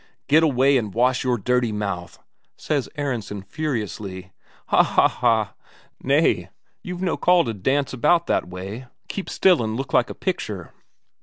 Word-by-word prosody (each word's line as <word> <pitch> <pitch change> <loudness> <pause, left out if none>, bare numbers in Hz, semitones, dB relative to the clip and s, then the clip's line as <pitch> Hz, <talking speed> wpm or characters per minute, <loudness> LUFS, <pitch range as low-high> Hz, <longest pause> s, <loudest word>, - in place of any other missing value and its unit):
"Get 155 +3 +5
away 140 -3 +4
and 105 -4 -4
wash 125 +2 +2
your 125 -2 +1
dirty 125 +2 +1
mouth," 100 -4 -4 0.4
says 145 -4 -2
Aronsen 115 -8 -3
furiously. 100 -7 -4 0.4
"Ha - - +6
ha - - +4
ha! 110 -3 +1 0.5
Nay, - - +2 0.3
you've 180 0 -6
no 180 - 0
call 175 -2 +4
to 115 - -2
dance 135 +9 0
about 165 +7 +3
that - - 0
way; 100 +8 -7 0.2
keep 195 - -5
still 180 -7 +4
and 110 -1 -2
look 135 +2 -5
like - - +3
a - - -6
picture!" - - -4
125 Hz, 155 wpm, -23 LUFS, 105-145 Hz, 0.5 s, Ha